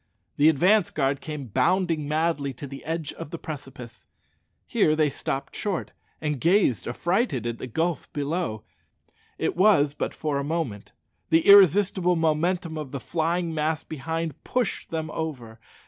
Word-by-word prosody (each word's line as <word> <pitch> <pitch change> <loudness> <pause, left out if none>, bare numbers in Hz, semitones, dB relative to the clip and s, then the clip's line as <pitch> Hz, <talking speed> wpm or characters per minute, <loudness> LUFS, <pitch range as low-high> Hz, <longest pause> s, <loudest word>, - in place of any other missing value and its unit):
The 150 +2 +6
advance 180 +6 +3
guard 140 -1 -1
came 150 -3 -6
bounding 160 - +1
madly 150 -2 0
to 140 - -8
the 135 0 -9
edge 160 -1 -3
of - - -8
the 170 - -5
precipice. 135 -7 -9 0.6
Here 155 - +2
they 155 -2 +2
stopped 135 +1 -4
short, 200 -5 -2 0.3
and 150 -4 -2
gazed 170 - +3
affrighted 170 - 0
at 115 -1 -3
the - - -5
gulf 165 +7 -2
below. 145 -6 -2 0.7
It - - -1
was 175 -7 +4
but - - -4
for 150 -3 -1
a - - -2
moment. 145 -9 -3 0.4
The 160 0 +3
irresistible 190 -2 +6
momentum 165 +1 0
of 145 -4 -6
the 140 - -4
flying 170 +3 -1
mass 155 0 -1
behind 160 +1 -4
pushed 250 -5 -2
them 160 -1 -3
over. 125 -9 -5
155 Hz, 150 wpm, -25 LUFS, 140-170 Hz, 0.7 s, The